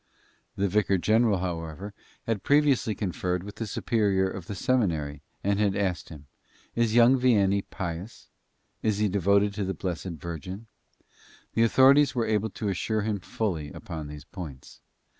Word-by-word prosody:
The 100 - +1
vicar 100 0 +2
general, 110 +2 +3
however, 85 +2 -5 0.3
had 115 -4 -1
previously 140 -7 +3
conferred 90 -2 -2
with 100 +1 -9
the 115 - -3
superior 100 -2 +1
of 95 -2 -7
the 100 - -5
seminary 80 - 0 0.2
and 100 0 +1
had 100 -2 +2
asked 95 -4 -1
him: 75 -3 -11 0.5
"Is 115 -1 +1
young 120 +2 +6
Vianney 100 -6 +3
pious? 90 +4 -6 0.5
Is 105 -2 +1
he 105 0 +2
devoted 100 +1 +2
to 100 0 -2
the 95 0 -2
Blessed 85 -1 -4
Virgin?" 85 +6 -7 0.9
The 115 - +1
authorities 135 +4 +5
were 120 -2 +1
able 110 0 0
to 105 +1 -3
assure 110 +3 -1
him 105 -1 -1
fully 85 -7 -3
upon 80 -3 -7
these 75 0 -9
points. 80 -9 -10
100 Hz, 155 wpm, -27 LUFS, 90-110 Hz, 0.9 s, young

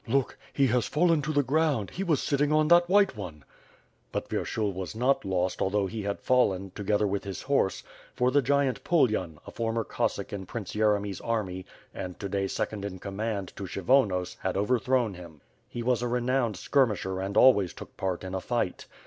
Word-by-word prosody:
Look! 135 +2 +1 0.2
he 140 - +2
has 125 -3 +1
fallen 165 0 +3
to 150 +2 -2
the 145 -1 +2
ground, 140 -5 +1
he 190 - -3
was 160 -7 +1
sitting 145 +1 +1
on 155 0 +3
that 175 0 +6
white 200 -5 +4
one." 85 -8 -8 0.7
But - - -3
Vyershul 105 -3 -1
was 95 +1 -5
not 125 +4 +2
lost 95 -1 -1
although 100 +1 +1
he 110 +3 -4
had 100 0 -3
fallen, 100 -7 +1
together 105 0 0
with 100 0 -1
his 100 -1 -6
horse, 135 -9 +1 0.3
for 125 +1 +2
the 145 +2 +4
gigantic 140 0 +1
Pulyan, 110 - +1
a - - -9
former 115 0 -1
Cossack - - -2
in 95 -2 -5
Prince 105 -6 -6
Yeremy's 105 -2 +1
army 95 -5 -3 0.3
and 90 -1 -6
to 100 - -3
day 95 0 0
second 100 +1 -3
in 100 -2 -5
comand 100 +1 -4
to 100 - -5
Kshy 95 +1 -6
vonos 100 -8 +2
had - - -2
overthrown 120 +1 +1
him. 85 -5 -12 0.3
He 120 - -5
was 125 0 +1
a 120 - -1
renowned 120 -3 0
skirmisher 105 -9 +1
and 95 +1 -3
always 100 -9 +6
took - - -11
part 95 -2 -2
in 95 0 -6
a 95 - -2
fight. 120 -3 -2
110 Hz, 195 wpm, -28 LUFS, 95-130 Hz, 0.7 s, that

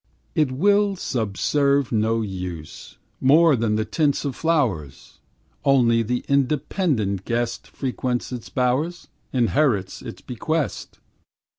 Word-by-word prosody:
It 150 -4 +2
will 200 +7 +3
subserve 140 - 0
no 115 0 +1
use, 90 -6 -7 0.2
More 155 +3 +5
than 110 -2 0
the 110 0 0
tints 145 +5 0
of 135 -3 -2
flowers; 115 - -1 0.4
Only 125 -5 +4
the 120 +2 -2
independent 140 - 0
guest 120 +1 -2
Frequents 125 -2 -3
its 125 -3 -6
bowers, 135 +7 -1 0.2
Inherits 120 -5 +1
its - - -9
bequest. 155 +5 -3
125 Hz, 110 wpm, -23 LUFS, 110-150 Hz, 0.4 s, More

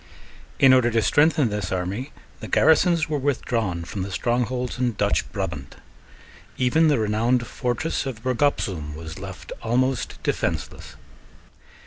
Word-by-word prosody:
In 135 -1 +6
order 125 -2 +4
to 115 -1 +1
strengthen 145 -2 +3
this 105 -3 -3
army 95 +9 -3 0.3
the - - -7
garrisons 160 +1 +4
were 150 -2 -1
withdrawn 115 -10 -1
from 95 +3 -5
the 95 - -4
strongholds 125 +5 -1
in 125 -2 +1
Dutch - - 0
Brabant. - - -5 0.8
Even 145 +6 +3
the 145 -3 +3
renowned 115 +3 +1
fortress 125 +6 -2
of 120 -4 -6
Bergopzoom 115 - 0
was 80 +2 -8
left 95 -1 -9
almost 125 +2 0
defenceless. - - -3
120 Hz, 130 wpm, -24 LUFS, 105-135 Hz, 0.8 s, In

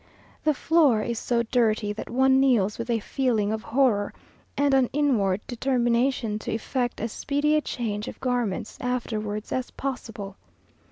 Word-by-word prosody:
The 305 -1 +2
floor 285 -9 +3
is 235 0 -2
so 235 -1 0
dirty 220 -3 +1
that 210 - -7
one 265 +2 +4
kneels 235 -7 +2
with 230 +1 -4
a 235 - +2
feeling 220 -3 0
of 220 - -3
horror, 230 -5 +1 0.4
and 285 -1 +3
an 265 -2 +4
inward 220 -10 +1
determination 240 -2 0
to - - -5
effect 245 +2 -2
as 225 - -3
speedy 290 +5 0
a 305 - +3
change 215 -7 -3
of - - -8
garments 240 -4 -2
afterwards 215 -4 -3
as 255 -1 -2
possible. 225 -7 -6
240 Hz, 155 wpm, -26 LUFS, 215-265 Hz, 0.4 s, one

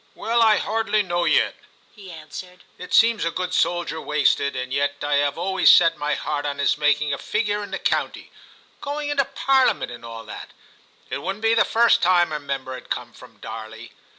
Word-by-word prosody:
*Well, 235 +1 0
I 220 -2 +5
hardly 215 -1 0
know 175 -2 -1
yet,' - - +2 0.4
he 200 -3 -12
answered; 175 +3 -10 0.2
'it 180 - -9
seems 225 -1 +4
a 165 - 0
good 180 +1 -4
soldier 175 -3 0
wasted, 140 -1 +1
and 130 0 -4
yet 140 +1 0
I 145 -1 +1
have 145 0 0
always 190 +2 +2
set 165 -2 +6
my 150 -1 -2
heart 145 -1 -3
on 145 -1 -3
his 140 - +2
making 150 -1 +1
a 140 - -4
figure 210 -1 -1
in 205 - -8
the - - -4
county - - -2 0.3
— - - -32
going 290 +1 -4
into 280 -2 +1
Parliament, 270 - +1
and 120 -1 -10
all 115 -1 -8
that; 105 - -10 0.6
it - - -2
wouldn't 195 +3 -5
be 225 0 +3
the 230 - +3
first 235 +1 +3
time 175 -2 +3
a 150 - -3
member 140 -2 -5
had 130 - -10
come - - -4
from - - -16
Darley. 110 +2 -9
170 Hz, 205 wpm, -22 LUFS, 145-210 Hz, 0.6 s, set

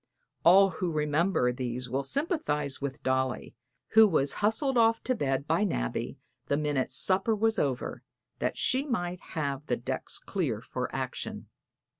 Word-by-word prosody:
All 195 +3 +7
who 175 +1 -2
remember 150 -3 +1
these 125 0 -4
will 135 +3 -1
sympathize 150 - -2
with 140 -1 -5
Dolly, 130 -1 -1 0.4
who 220 0 +7
was 145 -7 +1
hustled 240 +6 +1
off 225 -1 +3
to 255 - +1
bed 135 - -1
by 165 +6 +2
Nabby - - -2 0.3
the 140 - +1
minute 145 -3 0
supper 195 +4 +2
was 225 +1 +1
over, 135 -3 -2 0.4
that - - -1
she 270 +3 +1
might 180 -8 -2 0.2
have 140 -1 -2
the 120 - 0
decks 120 - -3
clear - - -2
for - - -4
action. - - -4
155 Hz, 150 wpm, -29 LUFS, 135-215 Hz, 0.4 s, All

